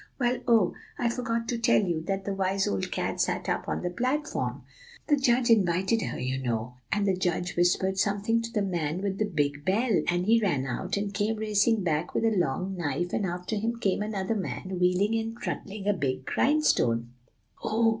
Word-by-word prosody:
Well, 245 0 +1
oh! 225 -6 +4 0.2
I 240 - +1
forgot 230 -1 -2
to 240 - -1
tell 235 +1 +4
you 170 -4 -1
that 195 0 -2
the 200 - -1
wise 195 0 0
old 95 -1 -2
cat - - -1
sat - - -1
up - - -1
on - - -2
the 180 - -1
platform, 260 +10 -2 0.4
the 295 - +4
judge 250 -3 +3
invited 190 +1 +3
her, - - -3
you 130 +1 -2
know. 120 -1 -2 0.2
And 205 0 +1
the 195 -2 +2
judge 180 0 -1
whispered 190 +2 +2
something 205 +3 +1
to 230 0 -6
the 210 -3 0
man 175 -2 -2
with 195 -1 -2
the 215 - +2
big 145 -6 -1
bell, 210 +5 +2
and 175 +1 +1
he 230 +2 +4
ran 145 -11 +1
out, 180 +10 -2
and 200 0 -2
came 210 +2 0
racing 215 0 +2
back 160 0 -1
with - - +1
a 225 - +4
long 185 +3 0
knife; 175 +1 -2
and 200 - 0
after 180 +4 -3
him 225 +3 -1
came 205 -3 0
another 210 -1 -1
man, 185 -1 -4
wheeling 180 +4 +2
and 225 +1 -4
trundling 200 -3 -5
a 205 - +4
big 130 -7 -2
grindstone" 120 - +2 0.5
"Oh!" 225 +1 +3
195 Hz, 200 wpm, -28 LUFS, 175-225 Hz, 0.5 s, oh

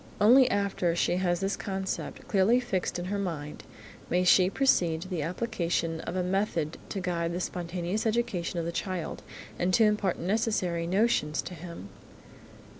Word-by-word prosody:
Only 245 +5 +7
after 200 -4 0
she 175 +1 +1
has 175 -1 0
this 195 +1 0
concept 190 -1 -4
clearly 210 +5 +4
fixed 200 -9 -2
in 175 - -4
her 200 +2 -2
mind, 155 -6 -4 0.5
may 180 +1 +2
she 185 0 +5
proceed 175 -10 +2
to - - -9
the 180 -4 -3
application 170 -2 -1
of 170 - -5
a 185 - 0
method 180 -4 -1
to 195 - -3
guide 170 -2 -1
the 175 - -2
spontaneous 180 +4 -2
education 220 -7 -1
of 170 - -1
the 170 - -2
child 185 -1 -4 0.4
and 180 +1 +1
to 225 - +5
impart 210 -4 +2
necessary 185 -4 0
notions 185 -6 +1
to 180 - -7
him. 170 - -9
180 Hz, 165 wpm, -28 LUFS, 170-200 Hz, 0.5 s, Only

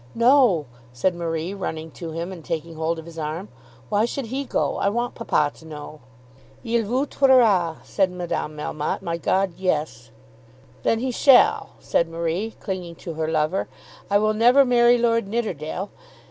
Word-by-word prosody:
"No," 235 - +4 0.3
said 125 +10 0
Marie, 170 +1 -3
running 160 -5 -5
to 165 +1 -7
him, 165 +3 -4
and 175 -4 -9
taking 165 +1 -4
hold 160 +1 -2
of 160 - -8
his 165 -1 -9
arm. 160 +6 -4 0.4
"Why 210 +2 +2
should 260 +2 -4
he 265 +5 -3
go? - - -1
I 200 - +1
want 240 +3 -2
papa 150 -10 0
to - - -16
know." 155 -1 -9 0.6
"Il 230 -2 0
vous 255 +6 0
tuera," 225 - +4
said 190 -2 +1
Madame 175 -4 -4
Melmotte. 150 0 -3
"My 170 0 -2
God, 190 +3 0
yes." 150 -10 -2 0.7
"Then 225 - +2
he 260 0 -1
shall," 260 +1 +4
said 170 - 0
Marie, 170 +6 -3
clinging 180 -3 -5
to 165 - -7
her 160 0 -2
lover. 160 +3 0 0.4
"I 200 - +4
will 215 +1 +2
never 245 +5 +5
marry 240 -1 +5
Lord 230 -2 +1
Nidderdale. 195 -4 -3
185 Hz, 165 wpm, -23 LUFS, 160-230 Hz, 0.7 s, never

